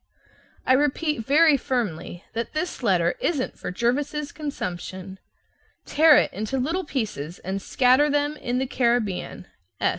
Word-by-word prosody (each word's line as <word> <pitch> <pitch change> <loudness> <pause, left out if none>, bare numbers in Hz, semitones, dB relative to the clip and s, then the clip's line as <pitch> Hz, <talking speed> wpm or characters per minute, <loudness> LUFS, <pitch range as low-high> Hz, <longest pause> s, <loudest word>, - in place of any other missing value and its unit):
I 260 - +4
repeat 295 -1 +1
very 305 +1 +5
firmly 190 -10 -3
that 230 0 -4
this 310 0 -3
letter 180 -7 +2
isn't 285 -7 -2
for - - -5
Jervis's 280 +8 -1
consumption. 190 - -6 0.7
Tear 310 -1 +6
it - - +2
into 215 +7 -3
little 325 +9 -1
pieces 200 - -4
and 190 +2 -4
scatter 260 +7 +3
them 290 +1 0
in 245 -4 -3
the 265 - 0
Caribbean. 235 -8 -1
255 Hz, 130 wpm, -24 LUFS, 195-295 Hz, 0.7 s, Tear